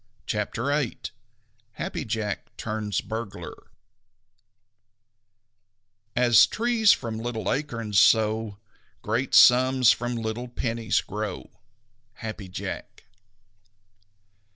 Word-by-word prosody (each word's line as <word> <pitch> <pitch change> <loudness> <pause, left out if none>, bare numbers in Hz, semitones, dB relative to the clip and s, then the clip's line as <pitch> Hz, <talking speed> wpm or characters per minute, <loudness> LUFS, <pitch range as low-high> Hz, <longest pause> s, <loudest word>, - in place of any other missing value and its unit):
CHAPTER 105 +3 -3
VIII 145 -6 -2 0.7
HAPPY - - -5
JACK 110 -2 -4
TURNS 105 -2 -3
BURGLAR 110 -1 -7 2.5
As 120 0 +6
trees 225 -2 +3
from 110 -2 -1
little 115 -3 -3
acorns, 115 -8 -1
so 110 -1 +3 0.5
Great 115 +5 -1
sums 130 0 +6
from 120 0 -2
little 115 +2 -4
pennies 115 -2 -1
grow. 105 +1 -6 0.7
_Happy 110 -4 -6
Jack. - - -7
115 Hz, 80 wpm, -25 LUFS, 110-125 Hz, 2.5 s, As